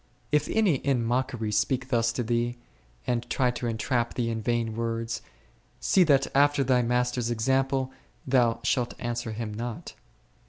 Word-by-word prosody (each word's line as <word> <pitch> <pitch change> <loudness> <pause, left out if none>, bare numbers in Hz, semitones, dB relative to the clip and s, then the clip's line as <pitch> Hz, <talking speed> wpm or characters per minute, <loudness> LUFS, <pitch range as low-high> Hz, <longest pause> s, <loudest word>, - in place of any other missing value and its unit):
If 150 0 +2
any 205 -10 +3
in 130 -3 0
mockery 120 -2 -1
speak 130 +4 0
thus 115 -2 +2
to 125 - -1
thee, 120 +1 -1 0.5
and 120 0 -1
try 125 0 +2
to 120 0 -4
entrap 115 +1 -1
thee 115 -2 0
in 115 -1 -3
vain 115 -1 -1
words, 115 0 -2 0.6
see 190 - +4
that 140 -3 +4
after 145 0 +4
thy 125 -1 +3
Master's 125 0 0
example 130 +3 +1 0.3
thou 120 -3 +2 0.4
answer 120 -1 -3
him 110 -1 -4
not. 115 +1 -6
120 Hz, 150 wpm, -27 LUFS, 115-130 Hz, 0.6 s, see